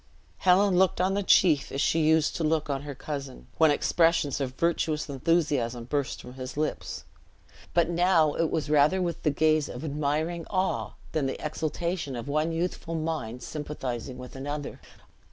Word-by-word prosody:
Helen 185 0 +4
looked 190 -2 +3
on 185 +1 +2
the 200 - 0
chief 165 -6 +4
as 135 - -3
she 160 +3 +2
used 155 0 +3
to 165 - -2
look 155 -1 +1
on 135 -1 -2
her 145 -1 -7
cousin, 140 - -6
when 160 -1 +6
expressions 165 -1 +2
of 130 -1 -3
virtuous 160 -1 0
enthusiasm 140 -5 0
burst 140 +3 -2
from 125 - -10
his 130 +1 -7
lips; 155 0 -3 0.7
but 170 -2 +4
now 170 -3 +3
it 165 -1 0
was 155 -2 -1
rather 150 +5 +4
with 175 -2 -2
the 155 - +2
gaze 155 0 +2
of 125 - -7
admiring 155 +3 -1
awe 190 -1 -1 0.2
than 145 -4 0
the 135 - -3
exhultation 155 -1 -3
of 120 +3 -6
one 155 +3 0
youthful 165 0 -3
mind 155 -7 -3
sympathizing 135 -4 -5
with 125 +1 -10
another. 145 +2 -5
155 Hz, 170 wpm, -27 LUFS, 140-165 Hz, 0.7 s, when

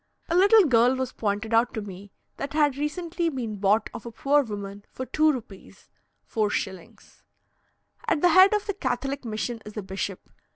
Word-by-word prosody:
A 335 - +1
little 405 +4 +6
girl 245 -2 +4
was 260 -1 -3
pointed 215 0 -2
out 230 +2 +3
to 220 - -2
me 195 0 -10 0.3
that 280 - -5
had 295 -3 +2
recently 335 +4 -2
been 235 -8 -4
bought 205 +2 +2
of - - -8
a 235 - -8
poor 285 +5 +2
woman 205 -4 -7
for 260 - -6
two 310 +3 +3
rupees 225 -8 -10 0.4
(4s.) 200 -4 -4 0.9
At 305 - +1
the 355 - +5
head 375 +3 +7
of 420 - -2
the 405 - -2
Catholic 270 -4 -3
mission 225 +1 -4
is 210 +1 -11
a 210 - -3
bishop. 190 0 -5
245 Hz, 175 wpm, -25 LUFS, 210-295 Hz, 0.9 s, head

